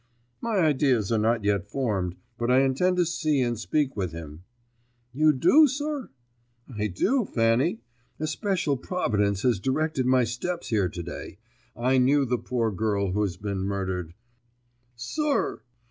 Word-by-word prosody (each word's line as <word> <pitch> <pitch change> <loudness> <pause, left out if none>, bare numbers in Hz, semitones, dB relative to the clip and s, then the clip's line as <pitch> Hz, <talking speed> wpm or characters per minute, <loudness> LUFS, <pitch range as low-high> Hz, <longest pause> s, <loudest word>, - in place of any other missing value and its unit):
"My 230 -3 -1
ideas 135 - +2
are 115 - +2
not 115 +1 +1
yet 100 -1 0
formed, 100 -10 -1 0.2
but 120 +1 -1
I 130 +1 +5
intend 160 +8 +1
to 175 - +3
see 155 -4 0
and 120 -1 -1
speak 145 +3 0
with 95 -5 -3
him." 80 0 -9 0.7
"You 155 +3 +4
do, 290 - +5
sir?" 290 0 -3 0.7
"I 105 0 -1
do, 230 - +1
Fanny, 115 - +1 0.4
A 155 - -1
special 155 -3 -1
providence 105 - -1
has 120 -6 +2
directed 135 +2 0
my 130 -1 +4
steps 145 +10 -4
here 100 -5 +1
to 85 +1 -6
day. 85 - -8 0.4
I 130 +3 +2
knew 135 +2 +3
the 125 -1 -1
poor 115 -3 -1
girl 100 -1 -1
who 105 +3 0
has 95 -4 -1
been 100 0 -3
murdered." 95 -3 -3 0.8
"Sir!" 290 - -1
120 Hz, 155 wpm, -26 LUFS, 100-155 Hz, 0.8 s, I